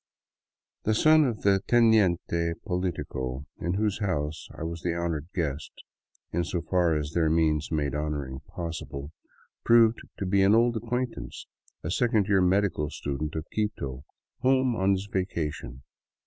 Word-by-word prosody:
The 110 - +1
son 155 +5 +6
of 120 -5 -3
the 100 -1 +4
teniente 90 -8 +3
politico 75 - -3
in 85 +2 -1
whose 105 0 0
house 80 -7 -2
I - - -5
was 85 0 -4
the 85 -1 -1
honored 85 -3 -2
guest, 75 -4 -2 0.6
in 85 +1 0
so 85 +1 -3
far 85 -4 +2
as 75 0 -3
their 80 -2 +2
means 80 -2 +1
made 75 -3 0
honoring 75 -3 -3
possible, 80 -4 -6 0.5
proved 115 -1 +5 0.2
to 100 - -3
be 95 +1 +3
an 100 +3 +5
old 120 +1 +3
ac 115 - -7
quaintance, 125 +1 -3 0.4
a 80 - -3
second 110 -1 +2
year 100 -1 +3
medical 90 -5 +2
student 75 +2 -4
of 80 -1 -3
Quito, 70 -12 -3 0.4
home 130 -1 +3
on 95 -1 +2
his 95 +1 -2
va 95 -2 0
cation. 75 -8 -5
85 Hz, 155 wpm, -27 LUFS, 75-105 Hz, 0.6 s, son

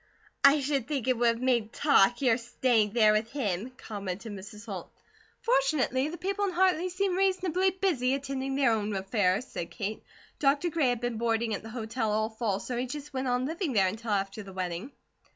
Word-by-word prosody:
"I 280 +1 +7
should 275 -3 -1
think 275 -5 -2
it 255 - +3
would 240 0 +2
have 230 +1 +1
made 240 -4 +1
talk, 245 -4 +4
your 240 -3 +5
staying 230 -3 +1
there 220 -3 +5
with 215 +1 0
him," 215 -5 -2
commented 200 0 -6
Mrs. 205 +2 -9
Holt. 195 -6 -7 0.5
"Fortunately, 275 - +2
the 335 +3 -6
people 395 +3 -1
of 370 -3 -3
Hartley 370 -1 +3
seem 375 +1 0
reasonably 375 -1 +2
busy 335 -9 +1
attending 270 -1 -3
their 270 -4 +3
own 210 -2 -1
affairs," 195 +2 +1
said 170 - -6
Kate. 215 -1 -4 0.4
"Doctor 290 +4 +2
Gray 295 -5 +2
had 245 -1 -1
been 240 -2 -2
boarding 230 -1 0
at 200 - -3
the 225 - -9
hotel 225 -1 -2
all 215 +1 +1
fall, 220 -3 -1
so 250 - -5
he 250 +1 -1
just 295 +2 -7
went 260 0 -2
on 250 +1 +1
living 320 0 -2
there 195 -4 +4
until 220 +5 -3
after 200 0 -1
the 195 -2 -10
wedding." 185 +6 -4
245 Hz, 200 wpm, -29 LUFS, 215-285 Hz, 0.5 s, I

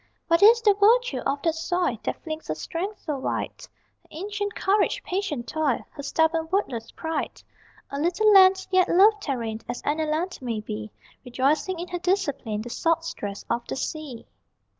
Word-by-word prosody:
What 335 +2 +3
is 460 +3 +7
the 415 -3 +6
virtue 465 +5 +3
of 280 0 -1
that 330 - +2
soil 335 -3 -1
That - - -4
flings 315 -1 -6
her - - -2
strength 385 +6 -5
so 295 -4 -2
wide? - - -2 0.5
Her - - -28
ancient 410 +4 -4
courage, 415 +5 +1
patient 360 -10 -3
toil, 305 -5 -1
Her - - -8
stubborn 320 +3 +1
wordless 245 - -1
pride? 320 -2 -4 0.5
A 280 - -3
little 360 +7 +3
land, 380 -1 +7
yet 370 0 +4
loved 410 +2 +4
therein 230 -5 -3
As - - -3
any 310 +2 0
land 335 +4 -2
may 235 -4 -3
be, 105 - -6 0.3
Rejoicing 275 +8 0
in 350 +2 -6
her 355 - -3
discipline, 285 - -1
The 240 - -8
salt 330 +3 0
stress 205 -11 -6
of 235 0 -2
the - - -3
sea. 275 -4 -5
325 Hz, 175 wpm, -25 LUFS, 275-385 Hz, 0.5 s, is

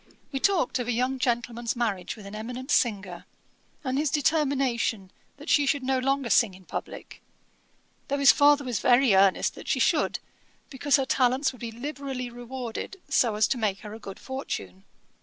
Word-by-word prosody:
We 270 - -2
talked 340 -7 +1
of 245 - -3
a - - 0
young 255 +3 0
gentleman's 240 -1 -1
marriage 210 -7 -2
with 215 -3 -12
an 200 - -9
eminent 250 +5 -6
singer, 195 -7 0 0.6
and 260 0 -1
his 300 0 +1
determination 275 - 0 0.3
that 290 +3 -12
she 290 -4 +3
should 280 0 +1
no 260 0 +1
longer 270 -2 0
sing 195 0 +4
in 185 0 -17
publick, - - -7 0.9
though 280 - -1
his 280 -1 +7
father 290 0 +4
was 245 -6 -2
very 250 -1 +4
earnest 190 0 +3
she - - +1
should, - - +2 0.5
because 275 0 +2
her 270 -2 +1
talents 260 +2 +2
would 250 - -15
be 230 -1 -5
liberally 265 0 -5
rewarded, 245 +8 -6
so 240 -5 +2
as 215 - +3
to 255 - 0
make 205 -3 -1
her 210 -1 -8
a 220 - -9
good 195 -3 -9
fortune. 95 - -6
250 Hz, 175 wpm, -26 LUFS, 220-275 Hz, 0.9 s, his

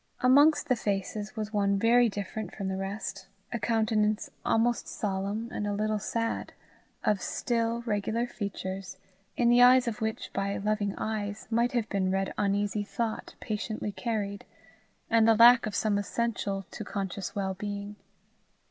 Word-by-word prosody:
Amongst 285 +5 +5
the 255 - +3
faces 205 +1 -3
was 215 -1 -4
one 200 -1 +2
very 235 +3 +4
different 205 +2 -5
from 195 -2 -3
the 190 - -2
rest, 195 0 -5 0.3
a 235 - -1
countenance 220 -1 +1
almost 235 +1 +1
solemn 200 +2 -2
and 205 - -3
a 205 - -1
little 215 +1 0
sad, 230 +2 -2 0.5
of 210 -3 +1
still, 235 0 -1
regular 220 +1 -1
features, 190 -4 -5 0.4
in 240 -1 +4
the 240 +1 +6
eyes 250 0 +7
of 225 -2 -3
which 220 0 -3
by 195 0 -1
loving 205 0 -1
eyes 210 -1 -3
might 235 +3 +2
have 235 -3 0
been 190 -2 0
read 195 0 -1
uneasy 205 0 0
thought 220 +2 -4
patiently 215 -1 -3
carried, 205 -3 -3 0.6
and 225 -1 +4
the 225 - +6
lack 235 +1 +7
of 205 - -4
some 205 -2 +1
essential 205 -3 -2
to - - -6
conscious 195 -1 -4
well 195 -1 -1
being. 205 +1 -5
210 Hz, 155 wpm, -29 LUFS, 200-230 Hz, 0.6 s, eyes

